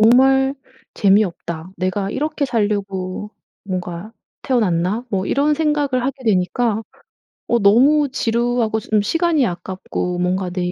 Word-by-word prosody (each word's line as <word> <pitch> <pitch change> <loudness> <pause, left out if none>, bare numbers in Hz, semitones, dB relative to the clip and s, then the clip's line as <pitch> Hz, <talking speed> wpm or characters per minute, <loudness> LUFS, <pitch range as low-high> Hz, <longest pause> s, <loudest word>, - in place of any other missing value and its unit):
정말 265 +4 +5 0.4
재미없다. 185 -4 +1
내가 195 +2 -1
이렇게 300 +3 -1
살려고 205 -4 -2 0.3
뭔가 185 +2 -5 0.3
태어났나?' 210 -2 0
뭐 190 -1 -1
이런 295 +2 +2
생각을 290 -5 0
하게 265 -1 -4
되니까 220 +3 +1 0.7
어 235 - +2
너무 270 +8 +4
지루하고 235 -2 0
좀 215 -1 +1
시간이 330 - +1
아깝고 180 0 -4
뭔가 180 +1 0
내 180 0 -2
215 Hz, 270 characters per minute, -19 LUFS, 185-260 Hz, 0.7 s, 정말